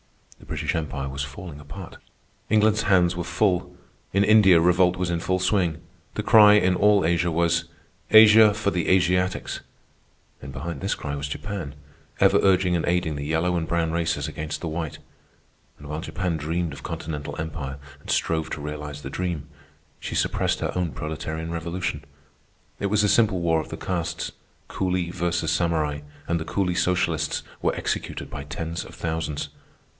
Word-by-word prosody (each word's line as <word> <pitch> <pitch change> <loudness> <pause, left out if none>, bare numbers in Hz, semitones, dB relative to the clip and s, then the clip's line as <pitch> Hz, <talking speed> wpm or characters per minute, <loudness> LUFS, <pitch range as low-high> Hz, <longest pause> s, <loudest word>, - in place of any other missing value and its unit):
The - - -16
British - - -2
Empire 70 -4 -3
was 70 +1 -4
falling 75 +2 -8
apart. 85 +5 -10 0.5
England's 110 0 +3
hands 90 -4 +3
were 85 - -3
full. 90 +2 0 0.3
In 100 +1 +3
India 100 -5 +6
revolt 90 +1 +3
was 90 -1 -1
in 85 - 0
full 95 +2 0
swing. 90 -4 +1 0.4
The - - -2
cry 105 -2 +8
in 95 -3 +3
all 105 -2 +4
Asia 85 +1 +2
was, 85 0 +1 0.4
"Asia 110 0 +8
for 105 -2 0
the 85 -3 -1
Asiatics!" 90 0 +1 0.8
And 65 - -8
behind 70 +3 -5
this - - -1
cry 70 - -5
was 70 0 -4
Japan, 80 -1 -5 0.4
ever - - +5
urging 95 -2 +3
and 85 - 0
aiding 85 -3 +1
the 70 0 -4
yellow 80 +4 +1
and 80 -2 -1
brown 85 -1 0
races 80 -3 -1
against 75 -1 -5
the 85 - -3
white. 80 -1 -4 0.8
And 75 - -12
while 75 +2 -4
Japan 90 -1 -2
dreamed 80 +1 -2
of 70 - -10
continental 75 -2 -5
empire 75 -4 -5 0.2
and - - -14
strove 80 -1 0
to 75 - -5
realize 75 0 -6
the 65 - -5
dream, 85 -4 -3 0.5
she - - -5
suppressed - - 0
her - - -1
own 90 -3 -1
proletarian 80 +1 -5
revolution. 85 -2 -3 0.8
It 100 - 0
was 105 +1 +2
a - - +4
simple 105 -3 +3
war 80 -2 +2
of - - -10
the - - -6
castes, 85 -2 -3 0.4
Coolie 90 -2 -1
versus 85 -2 -1
Samurai, 80 -4 0 0.3
and 85 0 0
the 80 - -5
coolie 90 -1 -1
socialists 85 -4 0 0.2
were - - +1
executed - - -3
by 70 - -5
tens 80 +3 -4
of - - -12
thousands. 80 -3 -3
85 Hz, 170 wpm, -24 LUFS, 80-90 Hz, 0.8 s, cry